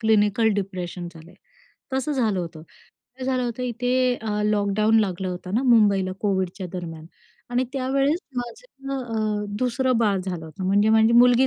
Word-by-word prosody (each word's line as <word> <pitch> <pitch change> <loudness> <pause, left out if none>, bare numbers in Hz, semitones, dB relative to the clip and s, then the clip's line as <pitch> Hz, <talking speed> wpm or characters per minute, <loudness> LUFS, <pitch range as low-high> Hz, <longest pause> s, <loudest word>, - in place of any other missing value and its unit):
Clinical 220 0 +3
depression 185 -3 -4
झालंय, 165 +2 -14 0.6
तसं 265 +3 0
झालं 220 -8 +1
होतं. 165 -2 -7
काय 250 +9 -15
झालं 255 -1 0
होतं 245 +1 -3
इथे 250 +1 +1
अ, 210 -1 -2
लॉकडाऊन 210 +1 +2
लागलं 190 -2 -2
होतं 180 +2 -5
ना, 245 - +2
मुंबईला 205 -6 +4
कोविडच्या 190 -2 -1
दरम्यान 165 -3 -6 0.4
आणि 245 +1 +1
त्यावेळेस 275 +4 +1 0.2
माझं 270 - -5
अ, 215 -3 -2
दुसरं 255 +1 +1
बाळ 205 -4 +2
झालं 180 -3 -5
होतं, 160 +4 -7
म्हणजे 205 +2 +3
माझी 220 +1 +5
मुलगी 245 +2 +6
220 Hz, 150 wpm, -24 LUFS, 190-250 Hz, 0.6 s, मुलगी